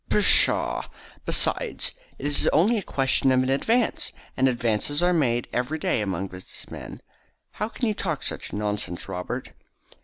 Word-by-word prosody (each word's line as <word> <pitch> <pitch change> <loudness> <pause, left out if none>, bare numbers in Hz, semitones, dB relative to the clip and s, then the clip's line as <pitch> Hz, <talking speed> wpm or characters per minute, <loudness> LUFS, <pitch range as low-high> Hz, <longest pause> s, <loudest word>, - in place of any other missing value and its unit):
"Pshaw! - - +4 0.4
Besides, - - +1 0.2
it - - -7
is 145 0 +2
only 210 +9 +4
a - - -4
question 135 -5 +1
of 130 0 +4
an 130 - -1
advance, 225 - +1 0.2
and 130 - +3
advances 120 +5 0
are 180 0 +4
made 120 -7 +1
every 125 +6 -1
day 135 - 0
among 95 -2 -2
business 90 0 -9
men. - - -8 0.5
How 215 +2 -3
can 245 - -3
you 215 - +1
talk 165 -8 -3
such - - -3
nonsense, 105 -4 -3
Robert?" 90 0 -5
130 Hz, 155 wpm, -25 LUFS, 105-165 Hz, 0.5 s, Pshaw